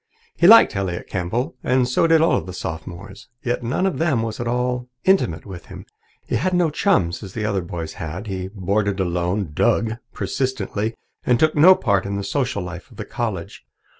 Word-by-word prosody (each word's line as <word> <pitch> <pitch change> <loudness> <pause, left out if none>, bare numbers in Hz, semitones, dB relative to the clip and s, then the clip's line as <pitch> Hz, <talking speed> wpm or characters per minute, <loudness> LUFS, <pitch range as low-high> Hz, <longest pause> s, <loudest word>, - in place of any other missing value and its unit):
He 170 - +4
liked 225 - +8
Elliott 95 -3 -2
Campbell, 120 - -3
and 125 0 +2
so 130 +6 +2
did 165 -1 +5
all 165 - +3
the 90 - -8
Sophomores. 90 +4 -7 0.2
Yet 120 +1 -1
none 125 +10 -1
of 190 - -1
them 150 -9 +1
was 110 -1 -4
at 120 - -3
all 125 +1 -1
intimate 140 - +2
with 95 -4 -9
him. - - -10 0.4
He - - 0
had 185 +9 0
no 175 -3 +2
chums, 150 - +1
as 95 -4 -9
the 110 - -2
other 100 -3 0
boys 85 -2 -6
had. 85 +6 -5
He 95 -3 -4
boarded 100 +1 -1
alone, 90 0 -1
"dug" 110 +8 +1
persistently, 115 -4 -2 0.3
and 125 -1 +2
took 155 0 +3
no 175 +6 +7
part 100 - +1
in 100 - -3
the 100 - -3
social 125 -5 -1
life 90 0 -8
of - - -17
the - - -5
college. - - -4
105 Hz, 195 wpm, -22 LUFS, 95-130 Hz, 0.4 s, liked